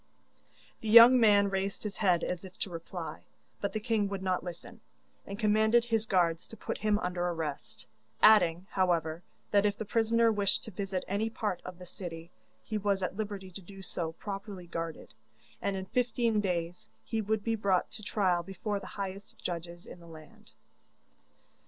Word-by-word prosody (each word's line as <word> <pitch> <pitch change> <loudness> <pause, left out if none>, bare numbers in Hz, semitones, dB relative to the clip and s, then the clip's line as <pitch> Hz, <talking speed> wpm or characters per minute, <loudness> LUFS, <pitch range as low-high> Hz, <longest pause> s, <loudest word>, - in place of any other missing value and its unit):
The 220 - -4
young 235 +3 +10
man 205 -3 +5
raised 195 +1 -2
his 210 -2 -5
head 180 -5 +3
as 180 0 -3
if 185 -1 -11
to 195 - -4
reply, 165 -1 -7 0.3
but - - -2
the 215 - -2
king 215 -2 +1
would 195 -1 -4
not 185 -2 0
listen, 175 -1 -9 0.5
and 200 - -5
commanded 220 +2 +3
his 225 -2 0
guards 170 -4 +1
to 225 - -11
put - - -4
him 215 -1 +2
under 180 -3 -2
arrest, 160 -5 -4 0.3
adding, 180 -5 +6
however, 170 -3 +1 0.3
that 200 -1 +4
if 205 -1 +1
the 220 - -4
prisoner 230 +2 +3
wished 205 -2 +1
to 220 - -8
visit 190 -1 -3
any 205 +3 0
part 210 -5 -3
of 180 -1 -8
the 180 - -10
city, 170 -2 -8 0.3
he 215 -1 -3
was 200 -1 0
at 185 - -2
liberty 200 -3 -5
to 195 - -9
do 195 +1 -12
so 165 -3 -3
properly 195 0 -7
guarded, 165 -1 -6 0.5
and 200 - -1
in 190 0 -4
fifteen 235 -1 +1
days 175 -3 -3
he 225 -1 -2
would 215 0 -1
be 230 - 0
brought 200 -4 +1
to 220 - -8
trial 190 -4 +1
before 195 +3 -4
the 190 - -10
highest 195 0 -6
judges 175 0 -5
in - - -11
the 170 - -14
land. 155 -2 -14
195 Hz, 180 wpm, -31 LUFS, 175-215 Hz, 0.5 s, young